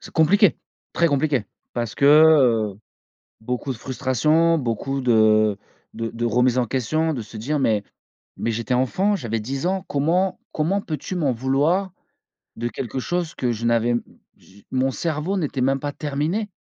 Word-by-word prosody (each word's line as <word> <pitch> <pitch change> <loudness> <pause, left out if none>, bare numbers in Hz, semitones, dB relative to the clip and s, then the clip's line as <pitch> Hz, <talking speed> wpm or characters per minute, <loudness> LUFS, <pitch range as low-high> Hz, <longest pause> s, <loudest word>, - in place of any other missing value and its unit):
C'est - - -12
compliqué, 190 +4 +4 0.4
très 170 - +2
compliqué. 140 -4 +1 0.3
Parce 120 -3 -3
que - - 0 0.7
heu, - - -20 0.6
beaucoup 125 +4 -3
de 115 - -10
frustration, 150 +7 +1
beaucoup 135 +2 -2
de 110 -4 +3 0.4
de 115 0 -4
de 120 +1 -4
remises 125 +2 +2
en 125 - +1
question 155 +7 0
de 120 - -4
se 110 - -12
dire: 145 +8 -2
«Mais 110 -6 +1 0.5
mais 115 - -2
j'étais 115 +2 -2
enfant, 185 +11 +1
j'avais 115 - -3
10 135 +8 -4
ans, 190 0 -1
comment 175 +7 0
comment 180 +6 0
peux-tu 155 +1 -5
m'en 150 -7 +1
vouloir 145 +10 +1 0.7
de 120 - -3
quelque 125 +1 -5
chose 175 +3 -2
que 125 - -1
je 115 0 -4
n'avais 115 0 +2
m 120 - 0 0.3
je 100 +2 -20
mon 130 +1 +1
cerveau 165 +6 -2
n'était 145 -6 -2
même 135 +2 +2
pas 145 +1 -3
terminé?» 155 +9 -2
135 Hz, 165 wpm, -22 LUFS, 120-160 Hz, 0.7 s, compliqué